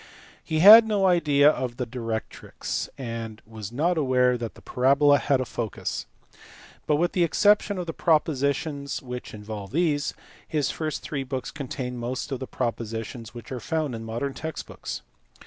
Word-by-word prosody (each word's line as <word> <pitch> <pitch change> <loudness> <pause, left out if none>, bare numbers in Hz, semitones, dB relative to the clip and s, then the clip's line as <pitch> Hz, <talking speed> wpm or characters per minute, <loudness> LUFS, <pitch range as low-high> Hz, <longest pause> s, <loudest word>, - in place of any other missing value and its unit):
^He 155 0 +1
had 220 +4 +11
no 205 -3 +2
idea 150 -6 +4
of 125 -5 -4
the 125 - -2
directrix, 115 -2 -4
and 115 -3 -5
was 110 -2 -8
not 160 +7 +1
aware 125 -3 +3
that 115 -2 -5
the - - -15
parabola 140 +3 +4
had 140 -2 +2
a 130 - -1
focus, 110 - -4 0.8
but, 150 - +3
with 175 +4 +1
the 180 - +2
exception 205 +3 +3
of 180 - -3
the 165 - -4
propo 160 -1 +2
sitions 140 +1 -2
which 125 -1 -6
involve 105 -1 -7
these, 150 -1 0 0.3
his 150 -3 0
first 155 -1 -4
three 145 -3 -3
books 130 -1 -4
contain 130 -3 -5
most 125 +4 -4
of 135 - -2
the 130 - -5
propositions 115 0 -4
which 120 - -10
are 130 - -3
found 155 +2 -2
in 115 -1 -5
modern 120 +5 -3
text 160 +2 -5
books. - - -7
135 Hz, 170 wpm, -26 LUFS, 120-155 Hz, 0.8 s, had